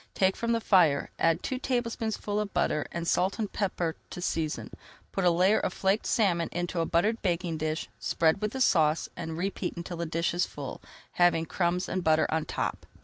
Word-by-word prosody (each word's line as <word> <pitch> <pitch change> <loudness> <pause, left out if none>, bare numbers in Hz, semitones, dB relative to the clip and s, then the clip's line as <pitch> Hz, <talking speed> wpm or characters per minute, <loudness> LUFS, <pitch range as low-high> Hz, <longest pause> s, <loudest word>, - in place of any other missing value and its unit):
Take 190 0 +3
from 235 0 -1
the 230 - +2
fire, 175 -10 +3
add 165 +1 +2
two 260 -2 -2
tablespoonfuls 230 -5 -1
of 205 -2 -5
butter, 150 -1 +1
and 170 -1 -4
salt 185 +3 +1
and 215 -4 -3
pepper 175 -5 -1
to - - -7
season. 165 -3 -2 0.4
Put 195 - -1
a - - +7
layer 185 +5 +4
of 185 - -2
flaked 195 +3 +1
salmon 175 -7 +2
into 175 0 -2
a 165 - +1
buttered 210 +7 +1
baking 170 -3 -1
dish, 155 +1 -2
spread 160 +4 +1
with 210 +1 -1
the 265 - -3
sauce, 155 -8 +3
and 160 0 -5
repeat 190 0 -3
until 170 0 -5
the 170 0 -3
dish 165 +2 0
is 175 +1 +1
full, 140 -3 -7 0.3
having 175 -2 +3
crumbs 180 +1 0
and 185 -1 -2
butter 160 -1 +4
on 160 -1 0
top. - - -3
175 Hz, 200 wpm, -28 LUFS, 165-200 Hz, 0.4 s, a